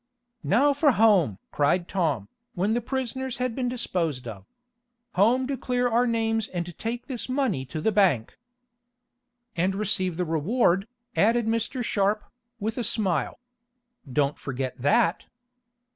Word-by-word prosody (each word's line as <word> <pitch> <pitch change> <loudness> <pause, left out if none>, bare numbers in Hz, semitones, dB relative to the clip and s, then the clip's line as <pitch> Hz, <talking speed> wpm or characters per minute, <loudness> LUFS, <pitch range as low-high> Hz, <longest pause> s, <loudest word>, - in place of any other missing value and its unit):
"Now 275 +8 +3
for 285 -1 +3
home!" 195 - +4
cried 170 +5 +1
Tom, 155 - -1 0.3
when 195 +4 +1
the 240 - 0
prisoners 260 +1 -3
had 250 -1 -1
been 250 0 -1
disposed 165 - -2
of. 100 -4 -8 0.7
"Home 235 +7 +3
to 275 +1 -2
clear 250 0 0
our 240 +1 +2
names 225 -1 0
and 175 -2 -5
take 235 +2 -3
this 255 -2 -5
money 255 - 0
to 145 +5 -5
the 220 - +1
bank!" 185 - +2 1.2
"And 185 +3 +1
receive 190 -4 0
the 180 - 0
reward," 180 - +1 0.3
added 230 +2 +3
Mr. 230 +3 -1
Sharp, 205 -1 +1 0.4
with 220 +3 -2
a - - -1
smile. 210 -5 0 0.7
"Don't 140 +2 +1
forget 130 -2 -4
that!" 165 +5 +2
210 Hz, 140 wpm, -26 LUFS, 170-240 Hz, 1.2 s, home